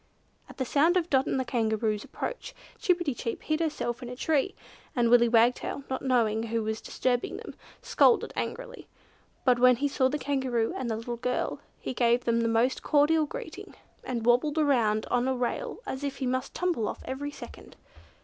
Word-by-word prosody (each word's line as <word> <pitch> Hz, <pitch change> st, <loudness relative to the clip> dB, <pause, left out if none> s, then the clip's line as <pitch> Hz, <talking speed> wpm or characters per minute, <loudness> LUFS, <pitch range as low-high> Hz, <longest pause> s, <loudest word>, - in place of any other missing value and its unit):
At -, -, -13 dB
the 260 Hz, -, -1 dB
sound 320 Hz, +8 st, +3 dB
of 345 Hz, -1 st, -1 dB
Dot 265 Hz, -1 st, +3 dB
and 265 Hz, -, 0 dB
the 260 Hz, -, -1 dB
Kangaroo's 220 Hz, -3 st, 0 dB
approach -, -, -6 dB, 0.2 s
Chip 360 Hz, -2 st, +3 dB
pi 345 Hz, -, -3 dB
ti 285 Hz, -5 st, -1 dB
chip 230 Hz, -1 st, -5 dB
hid 310 Hz, 0 st, 0 dB
herself 250 Hz, -7 st, -2 dB
in 245 Hz, -, -6 dB
a 250 Hz, -, -6 dB
tree, 305 Hz, +6 st, 0 dB, 0.4 s
and 235 Hz, -2 st, +2 dB
Willy 240 Hz, -1 st, +6 dB
Wagtail, 240 Hz, +4 st, +2 dB
not 260 Hz, -, -2 dB
knowing 230 Hz, -4 st, +2 dB
who 230 Hz, 0 st, -2 dB
was 220 Hz, 0 st, -3 dB
disturbing 245 Hz, -1 st, -1 dB
them, -, -, -9 dB, 0.3 s
scolded 470 Hz, -, +3 dB
angrily; -, -, -5 dB, 0.6 s
but 250 Hz, -2 st, +4 dB
when 250 Hz, 0 st, +6 dB
he 280 Hz, +4 st, 0 dB
saw 275 Hz, -2 st, +2 dB
the 295 Hz, -, -1 dB
Kangaroo 260 Hz, -6 st, -1 dB
and 255 Hz, -2 st, -3 dB
the 220 Hz, -, -1 dB
little 235 Hz, +1 st, -5 dB
girl, 250 Hz, +1 st, -2 dB, 0.2 s
he -, -, -4 dB
gave 240 Hz, 0 st, +2 dB
them 235 Hz, 0 st, +2 dB
the 230 Hz, -, +1 dB
most 230 Hz, +3 st, +1 dB
cordial 305 Hz, +1 st, +3 dB
greeting, -, -, -8 dB, 0.3 s
and 235 Hz, -3 st, -3 dB
wobbled 255 Hz, +6 st, +3 dB
about 235 Hz, -8 st, +2 dB
on 245 Hz, +1 st, +2 dB
a 265 Hz, -, +1 dB
rail 255 Hz, -, -2 dB
as 265 Hz, +2 st, -5 dB
if 280 Hz, -1 st, -2 dB
he 265 Hz, -, -3 dB
must 255 Hz, +1 st, -2 dB
tumble 345 Hz, -12 st, 0 dB
off -, -, -6 dB
every 275 Hz, +2 st, -4 dB
second. 290 Hz, -, -11 dB
255 Hz, 195 wpm, -28 LUFS, 235-290 Hz, 0.6 s, Willy